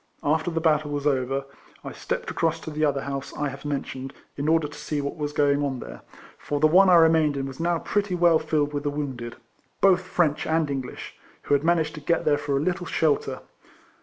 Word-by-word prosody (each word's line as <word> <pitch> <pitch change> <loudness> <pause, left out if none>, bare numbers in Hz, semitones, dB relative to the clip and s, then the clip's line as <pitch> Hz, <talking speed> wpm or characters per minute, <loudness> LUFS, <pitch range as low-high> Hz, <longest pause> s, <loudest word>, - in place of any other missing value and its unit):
After 155 +3 +1
the 165 -1 -1
battle 155 -2 +2
was 145 0 -3
over, 135 -1 0 0.4
I - - -6
stepped - - -4
across 165 0 0
to 160 - -7
the 155 +1 -2
other 140 -2 +1
house 140 -1 -5
I 145 -1 -1
have 135 +1 -10
mentioned, 135 -2 -4 0.2
in 145 +1 -3
order 160 -1 +3
to 145 - -13
see 150 0 -3
what 140 0 -3
Avas 145 -1 -2
going 145 0 +2
on 135 -3 -2
there; - - -9 0.4
for 145 - -3
the 155 - +4
one 185 +5 +6
I 180 - +7
remained 160 -3 +4
in 135 - -2
was 135 +1 -8
now 170 0 +1
pretty 205 +1 -1
well 170 -2 +4
filled 150 -2 0
with 145 - -2
the 145 - -1
wounded 135 -5 -5 0.4
(both 185 -2 +5
French 170 -5 0
and 160 -2 +1
English,) 130 -2 -5 0.3
who - - 0
had 145 0 +3
managed 165 -1 +2
to 150 - -8
get 170 +2 0
there 145 -1 +3
for 145 -1 -1
a - - 0
little 175 +2 -2
shelter. 155 -3 0
150 Hz, 220 wpm, -25 LUFS, 140-165 Hz, 0.4 s, I